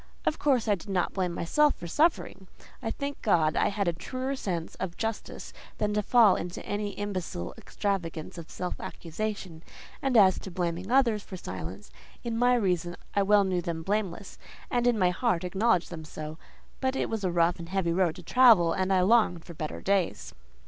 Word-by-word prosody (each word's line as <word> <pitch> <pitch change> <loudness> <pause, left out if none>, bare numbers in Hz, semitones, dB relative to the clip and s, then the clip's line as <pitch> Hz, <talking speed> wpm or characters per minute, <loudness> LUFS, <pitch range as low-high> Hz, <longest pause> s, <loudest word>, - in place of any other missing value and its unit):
Of 310 - 0
course 260 -6 +2
I 210 - +4
did 195 0 -6
not 185 -3 0
blame 185 -2 -1
myself 290 - +2
for - - -9
suffering: 195 - 0 0.3
I 225 - -2
thank 280 +4 -5
God 160 -7 +3
I - - +3
had 200 -2 -1
a 170 - +2
truer 255 +10 -4
sense 175 -9 -3
of 175 -2 -4
justice 225 -1 -4 0.2
than 210 0 0
to 210 - +1
fall 220 -2 +5
into 175 0 -5
any 205 0 -3
imbecile 185 - -4
extravagance 175 -4 -3
of 165 - -10
self 180 - -5
accusation; 180 -1 -5 0.4
and 265 -3 +2
as 190 -3 +6
to - - -8
blaming 175 +1 -3
others 240 -5 +3
for 190 -2 -9
silence, - - -7 0.3
in 235 -2 -2
my 245 +2 +4
reason 180 -6 0 0.2
I 200 - +4
well 205 +1 +5
knew 185 -2 0
them 165 -1 -4
blameless, 200 0 -3 0.3
and 245 0 +2
in 240 -2 +3
my 180 -3 +3
heart 185 -3 0
acknowledged 185 0 +1
them 160 -2 -6
so: 155 +1 -8 0.4
but 260 0 0
it - - 0
was 225 -2 -3
a 185 - +1
rough 170 0 +2
and 170 0 -8
heavy 185 -3 0
road 175 -3 +2
to 180 - -11
travel, 220 -5 +6
and 190 0 0
I 185 -1 +4
longed 185 -4 +3
for 170 - -9
better 155 -1 -5
days. 195 -3 0
190 Hz, 195 wpm, -28 LUFS, 175-220 Hz, 0.4 s, as